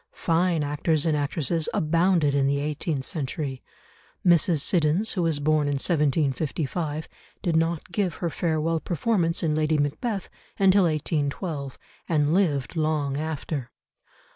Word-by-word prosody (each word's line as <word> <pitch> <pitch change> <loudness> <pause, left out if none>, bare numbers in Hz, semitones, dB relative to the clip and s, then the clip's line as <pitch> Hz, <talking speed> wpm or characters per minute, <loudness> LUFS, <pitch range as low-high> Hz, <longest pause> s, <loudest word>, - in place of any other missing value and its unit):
Fine 170 -1 +1
actors 150 +2 0
and 160 -2 +2
actresses 150 +2 -1
abounded 165 -1 +2
in 140 -1 +2
the 140 0 +1
eighteenth 145 -1 -2
century; 140 -3 -3 0.6
Mrs. 170 -3 +4
Siddons, 175 +6 +1
who 185 - -1
was 165 -3 +1
born 150 0 +2
in 145 - 0
1755, 150 +1 0 0.4
did 170 -4 +1
not 165 +1 0
give 185 -2 -1
her 170 -2 -3
farewell 165 0 0
performance 175 0 0
in 155 -2 +1
Lady 155 0 +1
Macbeth 180 - -2 0.3
until 195 -1 +5
1812, 150 -2 -2 0.3
and 150 -2 +2
lived 160 -7 +1
long 155 -3 0
after. 150 -3 -3
155 Hz, 130 wpm, -25 LUFS, 145-170 Hz, 0.6 s, until